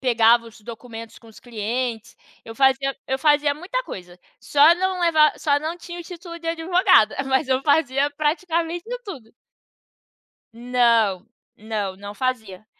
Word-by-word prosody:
pegava 235 Hz, -2 st, +3 dB
os 225 Hz, -1 st, -15 dB
documentos 230 Hz, 0 st, -10 dB
com 230 Hz, -, -20 dB
os 220 Hz, -, -16 dB
clientes, 235 Hz, 0 st, -4 dB, 0.3 s
eu 225 Hz, -, -10 dB
fazia 270 Hz, +1 st, +2 dB
eu 265 Hz, -, -1 dB
fazia 295 Hz, 0 st, +3 dB
muita 370 Hz, +11 st, -4 dB
coisa, 180 Hz, -, -10 dB, 0.2 s
só 295 Hz, +4 st, +5 dB
não 375 Hz, 0 st, -1 dB
levar 315 Hz, -3 st, +3 dB
só 285 Hz, -1 st, +1 dB
não 315 Hz, +3 st, -4 dB
tinha 345 Hz, 0 st, -9 dB
o -, -, -6 dB
título 340 Hz, 0 st, -10 dB
de 335 Hz, -, -11 dB
advogada, 330 Hz, -, +3 dB
mas 265 Hz, -1 st, 0 dB
eu 260 Hz, 0 st, +1 dB
fazia 285 Hz, -2 st, +2 dB
praticamente 330 Hz, +3 st, -2 dB, 0.2 s
tudo. 260 Hz, -, -10 dB, 1.2 s
Não, 230 Hz, -5 st, +1 dB, 0.3 s
não, 210 Hz, -3 st, -4 dB
não 200 Hz, +1 st, -9 dB
fazia. 220 Hz, -6 st, -4 dB
265 Hz, 145 wpm, -22 LUFS, 225-325 Hz, 1.2 s, só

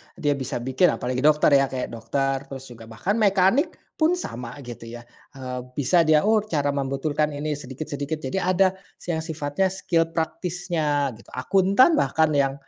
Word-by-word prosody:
dia 145 Hz, -1 st, +1 dB
bisa 130 Hz, -, -4 dB
bikin 130 Hz, +8 st, +3 dB
apalagi 125 Hz, +1 st, -3 dB
dokter 150 Hz, +2 st, +4 dB
ya, 135 Hz, -, +2 dB
kayak 130 Hz, -1 st, -4 dB
dokter, 135 Hz, +4 st, -2 dB
terus 135 Hz, -1 st, -8 dB
juga, 115 Hz, -2 st, -12 dB
bahkan 180 Hz, -, -2 dB
mekanik 205 Hz, -, +3 dB, 0.2 s
pun 325 Hz, +3 st, +3 dB
sama, 125 Hz, -, -6 dB
gitu 120 Hz, -2 st, -9 dB
ya. 120 Hz, +1 st, -9 dB, 0.3 s
Eee, 130 Hz, -1 st, -5 dB, 0.2 s
bisa 165 Hz, +4 st, +3 dB
dia, 155 Hz, -1 st, +5 dB
"Oh, 220 Hz, +1 st, +4 dB
cara 145 Hz, -6 st, 0 dB
membetulkan 145 Hz, +2 st, -1 dB
ini 150 Hz, +2 st, -3 dB
sedikit-sedikit," 145 Hz, +3 st, -5 dB
jadi 135 Hz, +8 st, -2 dB
ada 185 Hz, +1 st, +4 dB, 0.3 s
si 175 Hz, -, -6 dB
yang 160 Hz, -, -1 dB
sifatnya 160 Hz, +2 st, -1 dB
skill 175 Hz, -3 st, 0 dB
praktisnya, 160 Hz, -4 st, -1 dB
gitu. -, -, -18 dB
Akuntan 195 Hz, -, +4 dB
bahkan 160 Hz, -, +2 dB
yang, 135 Hz, -1 st, +2 dB
150 Hz, 165 wpm, -24 LUFS, 135-180 Hz, 0.3 s, dia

